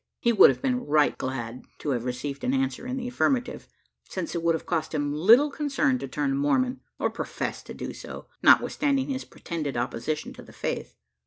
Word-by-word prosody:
He 235 - +2
would 215 - +9
have - - -2
been 255 -2 +1
right 150 0 +3
glad 125 -2 -4
to 150 - -2
have 120 -2 -1
received 130 +3 -4
an 255 +2 +1
answer 265 -2 -1
in 255 +1 -3
the 245 -2 -3
affirmative 250 0 0 0.4
since 320 - -4
it 170 - -2
would 165 0 +3
have 160 - -6
cost 160 -2 -1
him 145 -1 0
little 230 - +6
concern 275 - +1
to 135 - -5
turn 140 0 -1
Mormon, 250 - +1 0.2
or - - 0
profess - - -4
to - - -9
do - - -5
so, - - -9 0.2
notwithstanding 280 -2 +4
his 265 -1 -3
pretended 155 -7 -5
opposition 125 +5 -2
to - - -11
the - - -15
faith. - - -4
165 Hz, 195 wpm, -26 LUFS, -, 0.4 s, would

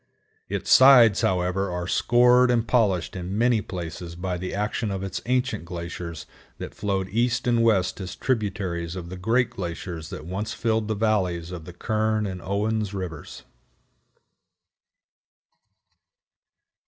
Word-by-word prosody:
Its - - -3
sides, 125 -6 +7
however, 90 +1 0
are 90 0 -3
scored 125 +4 +4
and 120 -2 +1
polished 105 -9 +1
in 95 +2 -4
many 120 -1 +3
places 85 -2 -7
by 90 +1 -3
the 90 +1 -5
action 105 +2 -2
of 95 -1 -3
its 95 -2 -4
ancient 125 -4 0
glaciers 85 -2 -6 0.3
that - - -7
flowed 100 -2 -2
east 120 +4 0
and 120 -1 +2
west 105 -4 +2
as 90 - -6
tributaries 95 -8 -2
of 85 -2 -7
the 95 - -6
great 115 +7 +1
glaciers 85 -3 -6
that - - -8
once 100 +5 -4
filled 110 -2 0
the 110 - -1
valleys 95 -6 0
of 85 -3 -7
the 90 - -9
Kern 110 +3 0
and 95 -2 -5
Owen's 105 +2 -1
rivers. 90 -5 -7
95 Hz, 140 wpm, -25 LUFS, 90-110 Hz, 0.3 s, sides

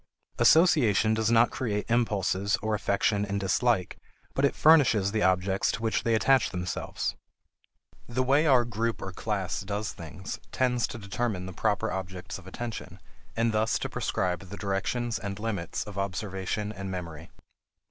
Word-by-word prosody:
Association 125 - +5
does 110 0 +1
not 115 +1 +5
create 105 -5 -2
impulses 100 -4 +1
or 110 0 0
affection 100 0 +1
and 100 -1 -2
dislike, 100 +1 +1 0.3
but 135 - -1
it 140 - +3
furnishes 130 -11 +5
the 110 0 0
objects 95 +1 +2
to 115 - -5
which 110 - +1
they 115 -1 +2
attach 125 -2 +3
themselves. 90 0 -3 0.9
The 130 +2 0
way 140 +5 +3
our 125 -4 +5
group 115 0 -2
or 95 - -5
class 95 -1 -2
does 105 +2 -3
things 90 +4 -7
tends 125 -2 +1
to - - -7
determine 100 -2 -3
the 95 - -7
proper 100 +3 0
objects 95 -1 -5
of 95 - -15
attention, 115 +3 -6 0.4
and 115 0 +2
thus 110 0 +1
to - - -4
prescribe 90 -2 -1
the 95 +3 -9
directions 110 +4 -1
and 100 0 -5
limits 105 -6 -3
of 100 -2 -7
observation 100 +1 -3
and 95 -2 -6
memory. 85 -4 -6
105 Hz, 160 wpm, -28 LUFS, 95-115 Hz, 0.9 s, Association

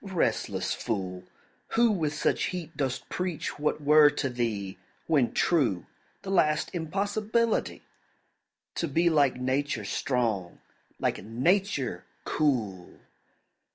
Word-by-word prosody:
Restless 160 - -1
fool, 95 -5 -4 0.5
Who 235 0 +4
with 155 -7 -1
such - - +1
heat 180 -4 -5
dost 130 -2 -2
preach 180 -5 -3
what 150 +1 0
were 150 +1 +7
to 140 - -2
thee, 110 -6 -3 0.3
When 140 -7 +2
true, 125 - +1 0.4
the 195 - -4
last 150 -5 +2
impossibility 205 +7 -1 0.9
To 170 - -2
be 170 +4 +2
like 145 -4 +3
Nature 130 -2 -1
strong, 110 -6 -1 0.4
like - - -1
Nature 135 - 0 0.2
cool! 110 -12 -1
145 Hz, 110 wpm, -28 LUFS, 115-175 Hz, 0.9 s, were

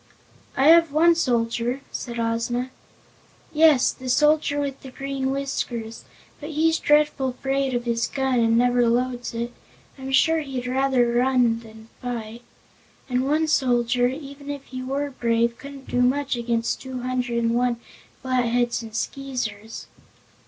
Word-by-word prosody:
"I 270 - +3
have 335 -2 +6
one 330 +3 +5
soldier," 240 -3 0
said 235 -2 -5
Ozma. 230 +2 -1 0.8
"Yes, 305 -4 +5
the 260 -1 -8
soldier 295 +2 +3
with 280 -2 -3
the 265 - -9
green 270 0 -3
whiskers; 245 -5 -4 0.3
but 295 - -7
he's 320 +1 +2
dreadful 295 -3 +2
'fraid 270 0 -1
of 240 - -1
his 230 -1 0
gun 265 -2 0
and 230 0 +3
never 245 0 +3
loads 245 0 -1
it. 235 +1 -3 0.5
I'm 265 0 -6
sure 320 +4 +4
he'd 265 -4 -5
run 250 +1 -3 0.2
rather 240 -2 +3 0.5
than 220 -1 -14
fight. 235 -2 -5 0.7
And 255 +1 0
one 315 +2 +2
soldier, 245 -4 +2
even 280 +1 -7
if 285 -1 -5
he 255 -2 -7
were 280 +2 -3
brave, 235 -2 0
couldn't 280 -1 -10
do 245 - 0
much 270 +2 +1
against 235 -1 -1
two 260 -1 -6
hundred 250 -1 -2
and 230 0 +1
one 245 0 +1 0.5
Flatheads 245 -2 +1
and 220 -1 -10
Skeezers." 225 -4 -4
255 Hz, 145 wpm, -24 LUFS, 235-275 Hz, 0.8 s, have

